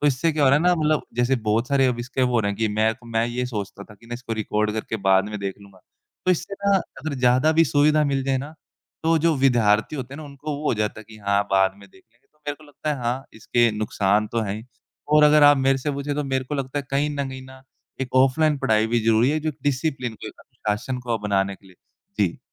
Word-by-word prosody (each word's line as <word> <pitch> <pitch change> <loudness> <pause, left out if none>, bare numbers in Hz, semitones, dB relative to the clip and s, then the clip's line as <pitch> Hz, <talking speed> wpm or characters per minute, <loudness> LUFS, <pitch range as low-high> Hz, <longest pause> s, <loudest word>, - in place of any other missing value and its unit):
तो 145 - +2
इससे 145 +4 +2
क्या 150 -1 0
हो - - +6
रहा 140 - +5
है - - -2
ना, 180 0 +5
मतलब 155 -2 +1
जैसे 120 +2 +2
बहुत 115 +5 +1
सारे 135 -2 +3
अब 120 -1 0
इसके 130 +2 -2
वो 125 -1 +2
हो 115 - +4
रहे 100 - 0
है 100 - -5
कि 110 -1 0
मैं 110 +1 +2
तो 120 0 -18
मैं 115 0 +1
ये 125 +1 -2
सोचता 100 -3 -6
था 105 - -15
कि 115 +3 -20
ना 120 - -5
इसको 120 -1 -6
रिकॉर्ड 105 +1 0
करके 110 0 -3
बाद 95 +2 +4
में 105 - -5
देख 100 -1 -4
लूँगा, 100 -2 -17 0.5
तो 185 - +4
इससे 185 +3 -1
ना 200 - +5
अगर 155 -5 -5
ज़्यादा 130 +4 +3
भी 165 +1 +5
सुविधा 150 +1 +3
मिल 135 -1 0
जाए 135 -1 +1
ना 145 +4 -7 0.5
तो 165 0 +3
जो 165 0 +2
विद्यार्थी 120 -1 +2
होते 130 0 -6
हैं - - -8
ना - - -8
उनको 145 +1 -6
वो 150 +1 -5
हो - - +2
जाता 105 +1 -2
है 105 - -13
कि 110 - -12
हाँ, 100 0 +1
बाद 95 0 +3
में 100 0 -16
देख 95 - -21
लेंगे, 120 - -36
तो 150 - -36
मेरे 145 - -2
को 155 - -18
लगता 150 +1 -5
है - - -7
हाँ, 125 +3 -2
इसके 120 +1 +2
नुकसान 105 0 +1
तो 115 - +1
हैं 100 -2 -2
ही 110 - -9 0.5
और 150 0 +6
अगर 150 0 +6
आप 145 0 +8
मेरे 135 0 +2
से 145 +3 -2
पूछें 140 +1 -3
तो 150 0 -2
मेरे 130 -1 -1
को 145 - -5
लगता 135 +1 -3
है 140 - -4
कहीं 140 +2 +1
न 140 -2 -3
कहीं 130 0 -8
ना 130 0 -14 0.4
एक 130 -1 -4
ऑफ़लाइन 140 +3 +3
पढ़ाई 110 -2 +2
भी 120 +1 +1
ज़रूरी 115 +4 +4
है 155 0 0
जो 155 - -2
एक 150 - -4
डिसिप्लिन 135 -4 -1
को, - - -10
एक - - -8
अनुशासन 105 +5 -4
को 120 -2 -2
बनाने 100 -1 +1
के 95 - -23
लिए। 90 - -19 0.4
जी। 95 -5 0
130 Hz, 275 wpm, -23 LUFS, 110-145 Hz, 0.5 s, आप